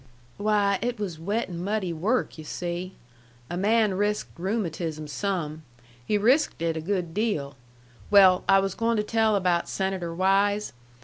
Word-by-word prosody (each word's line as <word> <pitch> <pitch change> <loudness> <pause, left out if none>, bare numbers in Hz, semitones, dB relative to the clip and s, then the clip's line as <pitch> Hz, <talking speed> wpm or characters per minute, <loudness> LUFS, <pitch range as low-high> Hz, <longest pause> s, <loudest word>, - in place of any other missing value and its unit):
"Why, 205 -2 +2
it 245 +1 -2
was 180 -6 -4
wet 205 +8 -1
an' 175 -1 -6
muddy 195 -3 -1
work, 195 +3 -1
yu' - - -7
see. 175 +3 -5 0.6
A - - -2
man 210 +2 +2
risked 205 +2 -1
rheumatism 170 -5 -3
some. 155 -1 -3 0.4
He 210 - +1
risked 255 - +2
it 165 -1 0
a 160 - -3
good 180 -1 -2
deal. 200 -10 -1 0.5
Well, 190 -3 +6
I 195 0 +6
was 195 -1 -2
going 230 +1 0
to 210 - +1
tell 220 0 +2
about 180 -3 +1
Senator 190 -3 -2
Wise. 200 +3 +2
195 Hz, 160 wpm, -26 LUFS, 170-210 Hz, 0.6 s, Well